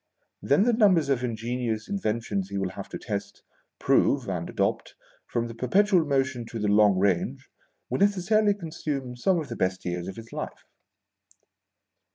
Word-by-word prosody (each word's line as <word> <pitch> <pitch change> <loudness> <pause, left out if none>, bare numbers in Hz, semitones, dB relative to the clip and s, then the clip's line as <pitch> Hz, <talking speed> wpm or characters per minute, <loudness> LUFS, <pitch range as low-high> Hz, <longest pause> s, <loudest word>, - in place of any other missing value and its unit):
Then 195 - +3
the 240 +1 +3
numbers 190 - +4
of 130 -3 +1
ingenious 115 -1 -2
inventions 115 - -2
he 100 - -4
will 95 -1 -1
have 100 +1 -8
to - - -5
test, 100 -3 -5 0.3
prove, - - +2
and - - -3
adopt, - - -1 0.3
from 120 0 -1
the 115 - -7
perpetual 180 - +3
motion 130 -3 0
to 115 - -6
the 105 -1 -1
long 105 -1 +5
range, 95 -2 0 0.4
will 130 - -2
necessarily 205 +1 +3
consume 150 -8 -4
some 175 +9 +2
of 155 - -5
the 115 - -4
best 95 -2 -1
years 90 0 -3
of 95 - -6
his 115 0 -11
life. - - -6
125 Hz, 165 wpm, -26 LUFS, 105-175 Hz, 0.4 s, long